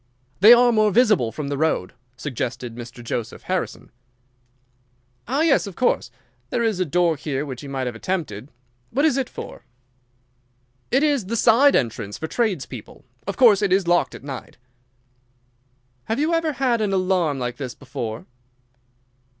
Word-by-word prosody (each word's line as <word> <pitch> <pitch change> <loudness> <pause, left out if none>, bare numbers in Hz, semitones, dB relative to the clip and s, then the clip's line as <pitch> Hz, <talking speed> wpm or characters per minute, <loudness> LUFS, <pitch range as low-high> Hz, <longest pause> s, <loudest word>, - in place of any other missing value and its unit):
"They 210 +5 +8
are 240 0 +7
more 215 -2 +3
visible 210 - +3
from 140 +5 -5
the 140 -1 -3
road," 155 -12 0 0.2
suggested 125 -3 -4
Mr. 120 +1 -9
Joseph 115 -1 -4
Harrison. - - -3 1.4
"Ah, 270 +6 0
yes, 310 -9 +3
of 195 - -8
course. 250 - +1 0.4
There 235 - 0
is 220 -5 0
a 185 - +1
door 170 +1 +2
here 140 0 -3
which 130 -4 -7
he 145 - -9
might 135 -1 -3
have 125 - -3
attempted. 135 - -4 0.4
What 285 +5 +1
is 310 - +3
it 270 -2 -1
for?" - - -9 1.3
"It 270 +4 +2
is 285 -10 +1
the 230 - -2
side 250 +6 +5
entrance 105 -3 -1
for 160 - -5
trades 195 - -1
people. 125 -2 -11 0.2
Of 200 - -3
course 220 -6 +6
it 200 -3 +1
is 190 -1 +2
locked 175 0 +2
at - - -11
night." 135 -2 -8 1.5
"Have 225 - -2
you 310 +3 +1
ever 330 -2 +1
had 250 -4 +1
an 205 -2 0
alarm 185 -6 +1
like 120 -2 -4
this 130 -3 -6
before?" 120 -4 -6
180 Hz, 165 wpm, -22 LUFS, -, 1.5 s, They